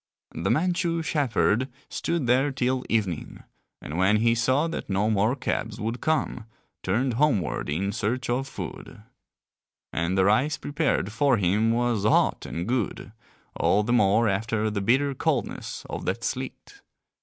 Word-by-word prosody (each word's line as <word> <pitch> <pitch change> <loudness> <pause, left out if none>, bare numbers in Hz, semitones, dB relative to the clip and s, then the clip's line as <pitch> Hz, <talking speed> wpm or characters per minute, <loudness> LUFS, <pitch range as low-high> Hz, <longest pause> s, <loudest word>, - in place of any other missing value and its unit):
The - - -2
Manchu 170 0 +1
shepherd 130 -4 +1 0.2
stood 170 -5 -2
there 130 +4 +3
till 130 -1 0
evening, 100 -7 -2 0.4
and 75 +5 -5
when 100 +3 +4
he 115 +2 +3
saw 130 +7 +2
that 165 - -5
no 100 +3 +1
more 110 +4 +2
cabs 115 -4 -3
would 115 +3 -3
come, 155 -7 -1 0.4
turned 120 +7 0
homeward 115 - +1
in 95 +7 -1
search 120 +5 -2
of 130 +3 -1
food. 105 - -8 0.9
And 85 +3 0
the 95 - +4
rice 125 +9 +2
prepared 145 - -1
for 130 +3 +3
him 100 +4 +2
was 120 -2 +1
hot 110 - +2
and 85 +3 -4
good, 120 -3 -2 0.4
all 105 - +2
the 120 +3 0
more 110 0 +4
after 110 +2 0
the 100 -1 -2
bitter 135 +7 +2
coldness - - -2
of - - -5
that - - -2
sleet. - - -5
115 Hz, 150 wpm, -26 LUFS, 105-135 Hz, 0.9 s, when